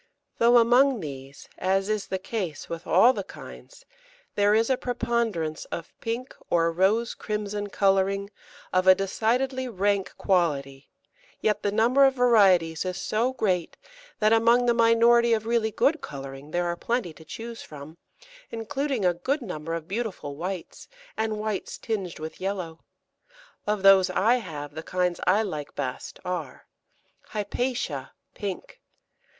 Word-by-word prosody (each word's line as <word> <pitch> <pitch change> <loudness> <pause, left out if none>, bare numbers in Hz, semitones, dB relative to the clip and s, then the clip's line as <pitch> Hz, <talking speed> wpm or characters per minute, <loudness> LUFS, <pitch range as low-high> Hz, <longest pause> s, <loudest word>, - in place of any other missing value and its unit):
Though 240 +1 +6
among 245 +2 +5
these, 140 -3 -9
as 195 +1 +1
is 215 -1 -1
the 190 - -2
case 185 -5 -4
with 170 +1 -7
all 250 +2 +6
the - - -4
kinds, - - -12 0.5
there 205 +1 +3
is 225 +3 +2
a - - +4
preponderance 235 -10 -2
of 165 - -7
pink 235 +3 -4
or 165 -1 +2
rose 200 +7 +2
crimson 210 -1 -4
colouring 195 0 +1 0.4
of 185 0 +2
a 185 - +9
decidedly 250 +7 0
rank 200 -3 -1
quality, 140 -7 0 0.5
yet 215 -1 0
the 205 - 0
number 235 +6 +4
of 270 -1 +3
varieties 195 -10 +4
is 185 -1 -3
so 230 +6 0
great, 185 -9 -1 0.4
that 215 +1 +3
among 235 +2 +4
the 240 - +4
minority 235 0 +5
of 220 -1 0
really 230 -1 +1
good 295 +9 +1
colouring 135 0 -8
there 175 +2 -1
are 170 0 -1
plenty 230 -3 -2
to 160 - -15
choose 230 +8 -8
from, 155 +3 -11 0.5
including 260 0 -2
a 180 - +4
good 260 - -2
number 165 -5 -4
of 165 -1 -6
beautiful 195 -8 -4
whites 180 +3 -6 0.3
and 220 -1 -1
whites 210 -2 -3
tinged 195 -6 -4
with 160 +3 -8
yellow. 185 -4 -3 0.9
Of 210 -2 0
those 195 -1 +7
I 220 +7 +3
have, 145 -10 -7
the 160 - -6
kinds 180 +1 -1
I 205 +4 +4
like 155 -8 -5
best 130 -3 -5
are 175 -7 -5 0.7
Hypatia, 245 +4 -3 0.2
pink. 205 - -6
200 Hz, 145 wpm, -26 LUFS, 175-230 Hz, 0.9 s, a